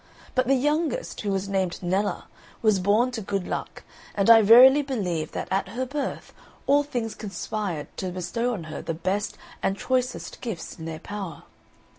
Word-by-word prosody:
But 255 -2 +1
the 270 - +4
youngest, 305 - 0
who 205 - -2
was 195 0 -1
named 190 -3 -1
Nella, 190 +2 0 0.4
was 215 -3 +4
born 210 +7 +3
to 235 -3 -4
good 195 -2 -2
luck, - - -5 0.3
and 200 +2 +5
I 225 -1 +9
verily 250 +7 +8
believe 185 - -2
that - - -3
at 195 0 +1
her 240 +6 -3
birth 275 +1 -4 0.3
all 285 +1 +5
things 245 -6 -3
conspired 195 -4 -4
to 185 - -3
bestow 185 +7 -2
on 180 - -6
her 155 0 -6
the 165 - -3
best 190 +5 -2 0.2
and 195 - 0
choicest 255 +1 -2
gifts 225 -10 -6
in 160 - -7
their 160 -1 -5
power. 195 0 -7
205 Hz, 175 wpm, -25 LUFS, 185-250 Hz, 0.4 s, I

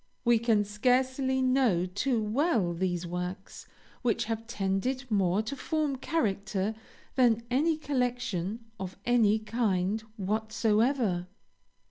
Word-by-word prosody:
We 235 -1 +5
can 220 -3 +3
scarcely 260 +5 +1
know 255 -9 +3
too 220 +5 0
well 220 - +1
those 175 0 -1
works 180 +3 -6 0.3
which 240 -3 +1
have 225 0 -4
tended 235 +5 -1
more 195 0 +2
to 230 +6 -4
form 300 -1 -1
character 210 -8 -1 0.4
than 235 -3 +3
any 305 +5 +2
collection 245 - -2
of 190 -1 -6
any 225 -3 +4
kind 215 -2 0 0.2
whatsoever. 215 0 +1
220 Hz, 110 wpm, -29 LUFS, 195-255 Hz, 0.4 s, We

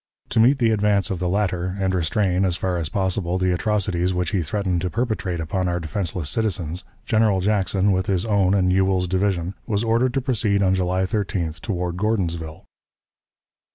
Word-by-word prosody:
To - - +1
meet 125 +5 +5
the 115 -4 +2
advance 105 -3 +2
of 95 - -2
the 90 0 -1
latter, 95 -1 -1
and 95 -1 0
restrain, 90 +2 +1
as 90 -2 +1
far 95 -2 -1
as 80 -4 -2
possible, 95 -1 -1
the 95 0 +1
atrocities 95 -2 0
which 90 -2 -1
he 95 - +1
threatened 90 +2 -1
to 90 - -1
perpetrate 95 -6 -2
upon 90 +3 -1
our 90 0 -1
defenseless 85 -1 -3
citizens, 90 -3 -1 0.2
General 110 -3 +2
Jackson, 100 0 +1
with 95 -1 0
his 95 +1 0
own 100 -3 +2
and 90 -2 +2
Ewell's 95 -1 +2
division, 95 -1 0
was 105 -1 0
ordered 115 +2 +1
to 135 - +1
proceed 105 -6 +1
on 95 -1 +3
July 95 0 0
13th 95 -5 -2
toward 90 -3 -3
Gordonsville. 85 -7 -2
95 Hz, 180 wpm, -22 LUFS, 90-105 Hz, 0.2 s, meet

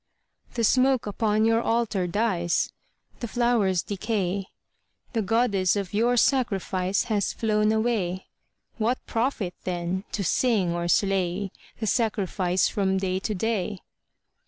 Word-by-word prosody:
_) - - -25
The 235 - 0
smoke 260 +2 +3
upon 215 +1 +1
your 225 0 +3
Altar 225 -6 0
dies, 175 -3 0 0.5
The 235 - -4
flowers 225 -7 +1
decay, 200 -2 -2 0.7
The 225 - +1
Goddess 200 -3 +2
of 200 -2 -3
your 235 +4 +2
sacrifice 195 -7 +1
Has 210 -5 -1
flown 215 -1 +1
away. 220 -5 0 0.5
What 235 +4 +1
profit, 225 -6 -1
then, 180 +1 -2
to 200 - -1
sing 195 -2 +2
or 170 0 -2
slay 195 0 +1 0.3
The 220 - -2
sacrifice 195 -5 +1
from 190 -2 0
day 190 -1 -1
to 210 +2 -3
day? 205 -1 -2
205 Hz, 130 wpm, -26 LUFS, 185-225 Hz, 0.7 s, smoke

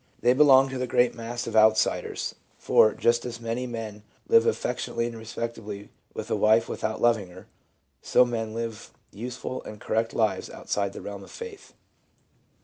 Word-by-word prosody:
They 120 +1 +5
belong 135 -1 +6
to 130 -1 -4
the 130 - -1
great 125 -1 +3
mass 120 +1 -5
of - - -5
outsiders; 110 0 +2 0.2
for, 110 - +5
just 120 0 +2
as 120 -1 -6
many 120 +2 -3
men 110 -3 -6 0.3
live 460 +1 +5
affectionately 460 - -1
and 120 -1 -5
respectably 110 -2 -6 0.3
with - - -6
a - - +3
wife 110 +2 +4
without 110 - -3
loving 115 -5 +2
her, 90 +1 -13 0.6
so 125 - +4
most 120 - -5
men 115 -2 -3
live 115 -2 -5 0.2
useful 125 +4 -6
and 105 - -10
correct 115 +2 -1
lives 110 -2 0
outside 100 -1 -2
the - - -8
realm 100 -1 -7
of - - -13
faith. 460 -4 -10
115 Hz, 170 wpm, -26 LUFS, 110-125 Hz, 0.6 s, belong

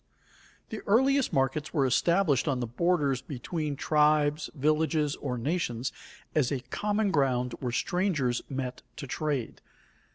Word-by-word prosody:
_ - - -39
The 220 - -5
earliest 265 +5 +3
markets 135 +4 0
were 140 -3 +3
established 150 +3 +2
on 135 -3 +1
the 120 - -1
borders 140 +1 +1
between 150 +2 -4
tribes, 150 +1 +2
villages 155 +1 +1
or 125 -3 -3
nations 130 -3 -1 0.4
as 150 -4 +2
a 135 -3 -1
common 210 -1 0
ground 125 -5 +1
where 125 -2 -2
strangers 150 -4 0
met 130 -2 -4 0.2
to - - -5
trade. 140 -3 -3
145 Hz, 135 wpm, -28 LUFS, 130-165 Hz, 0.4 s, earliest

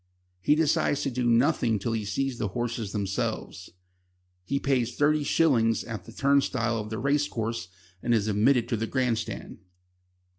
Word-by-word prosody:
He 150 - +4
decides 150 -2 +1
to 135 - -1
do 120 -1 0
nothing 115 -1 +3
till 110 +4 -3
he 110 -2 -2
sees 125 +5 -2
the 105 - 0
horses 120 -3 -2
themselves. 100 -2 -3 0.7
He 140 +9 -1
pays 125 -4 0
thirty 150 +1 +2
shillings 120 -8 +2
at 110 -3 -7
the 115 - -11
turnstile 130 -3 +1
of 105 0 -5
the 110 - -4
race 145 +3 +1
course 115 -6 -3 0.3
and 120 - -1
is 110 -3 +2
admitted 115 +4 +3
to 115 - 0
the 115 +1 -2
grand 125 -3 0
stand. - - -7
120 Hz, 165 wpm, -27 LUFS, 110-135 Hz, 0.7 s, He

